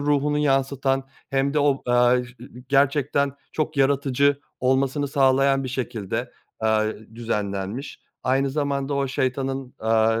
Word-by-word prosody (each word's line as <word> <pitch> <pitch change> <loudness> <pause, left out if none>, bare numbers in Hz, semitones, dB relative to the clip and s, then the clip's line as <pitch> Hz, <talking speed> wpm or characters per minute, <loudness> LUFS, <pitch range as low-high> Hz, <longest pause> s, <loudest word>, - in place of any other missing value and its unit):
ruhunu 145 0 +1
yansıtan 135 -1 +1 0.3
hem 135 +1 +1
de - - +3
o, 145 -2 +2
aaa, 120 0 +4
e - - +1
i 125 0 -13
gerçekten 140 0 +2 0.2
çok 155 0 -2
yaratıcı 140 0 +2 0.2
olmasını 135 +2 +1
sağlayan 135 0 +3
bir 130 - -3
şekilde, 115 -6 -3 0.3
aaa, 110 -1 +2 0.3
düzenlenmiş. 105 +1 -3 0.2
Aynı 135 +1 +1
zamanda 140 -1 -1
o 140 -1 0
şeytanın, 135 0 -2
aaa, 110 0 +2
135 Hz, 130 wpm, -24 LUFS, 125-140 Hz, 0.3 s, aaa